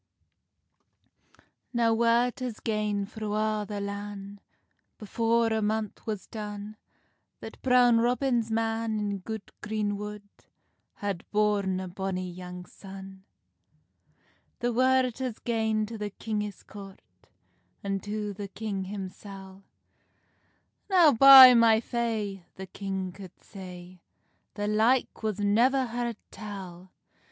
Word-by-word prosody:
Now 230 Hz, -1 st, +3 dB
word 235 Hz, +2 st, +2 dB
has 250 Hz, -4 st, -5 dB
gane 210 Hz, -2 st, -1 dB
thro 210 Hz, 0 st, -5 dB
a' 215 Hz, 0 st, 0 dB
the 205 Hz, -1 st, -4 dB
lan, 200 Hz, 0 st, -6 dB, 0.6 s
Before 230 Hz, +1 st, +1 dB
a 220 Hz, -, 0 dB
month 215 Hz, 0 st, -2 dB
was 210 Hz, -3 st, -3 dB
done, 210 Hz, -1 st, -7 dB, 0.6 s
That -, -, -10 dB
Brown 245 Hz, -2 st, +5 dB
Robin's 240 Hz, -1 st, +1 dB
man, 225 Hz, 0 st, -1 dB
in 205 Hz, -1 st, -2 dB
good 220 Hz, +2 st, -7 dB
green 210 Hz, -1 st, -2 dB
wood, 210 Hz, 0 st, -7 dB, 0.7 s
Had 200 Hz, -4 st, -5 dB
born 205 Hz, -3 st, +1 dB
a 185 Hz, -, -5 dB
bonny 185 Hz, 0 st, -4 dB
young 180 Hz, 0 st, -9 dB
son. 190 Hz, 0 st, -12 dB, 1.3 s
The 240 Hz, 0 st, -1 dB
word 255 Hz, 0 st, +2 dB
has 255 Hz, -4 st, -3 dB
gane 220 Hz, -2 st, 0 dB
to 225 Hz, 0 st, -8 dB
the 210 Hz, 0 st, -3 dB
kingis 210 Hz, 0 st, -5 dB
court, 195 Hz, -2 st, -11 dB, 0.8 s
An 195 Hz, -1 st, -1 dB
to 210 Hz, 0 st, -4 dB
the 200 Hz, 0 st, -6 dB
king 200 Hz, -1 st, -4 dB
himsel; 195 Hz, 0 st, -9 dB, 1.2 s
"Now, 355 Hz, -6 st, +6 dB
by 265 Hz, 0 st, +11 dB
my 230 Hz, -2 st, +5 dB
fay," 220 Hz, -5 st, -3 dB
the 190 Hz, -, -7 dB
king 190 Hz, 0 st, -4 dB
could 185 Hz, -1 st, -12 dB
say, 180 Hz, -2 st, -11 dB, 0.5 s
"The 205 Hz, 0 st, -2 dB
like 225 Hz, +5 st, +2 dB
was 215 Hz, -2 st, -2 dB
never 240 Hz, +6 st, +3 dB
heard 235 Hz, -1 st, -3 dB
tell!" 190 Hz, -4 st, -9 dB
210 Hz, 120 wpm, -28 LUFS, 195-230 Hz, 1.3 s, by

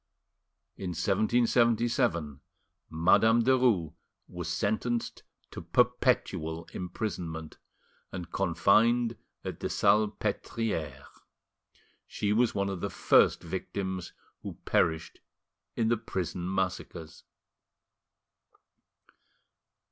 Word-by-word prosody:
In 95 Hz, -, -4 dB
1777, 110 Hz, -, +1 dB, 0.5 s
Madame 110 Hz, +8 st, +4 dB
Derues 120 Hz, -11 st, +2 dB, 0.3 s
was 90 Hz, -2 st, -6 dB
sentenced 110 Hz, +6 st, -1 dB, 0.3 s
to -, -, -7 dB
perpetual 80 Hz, +1 st, +1 dB
imprisonment, 85 Hz, -4 st, -5 dB, 0.5 s
and 90 Hz, -2 st, -7 dB
confined 110 Hz, +7 st, +3 dB, 0.3 s
at -, -, -5 dB
the -, -, -3 dB
Salpetriere. 105 Hz, -3 st, 0 dB, 1.0 s
She 105 Hz, 0 st, -1 dB
was 120 Hz, +2 st, +2 dB
one 100 Hz, 0 st, 0 dB
of 95 Hz, -3 st, -5 dB
the -, -, -2 dB
first -, -, +3 dB
victims 95 Hz, +1 st, -4 dB, 0.3 s
who -, -, -7 dB
perished 80 Hz, 0 st, 0 dB, 0.6 s
in 115 Hz, -1 st, +1 dB
the 120 Hz, -, +2 dB
prison 90 Hz, -4 st, -4 dB
massacres. 90 Hz, -3 st, -4 dB
95 Hz, 80 wpm, -29 LUFS, 85-115 Hz, 1.0 s, Madame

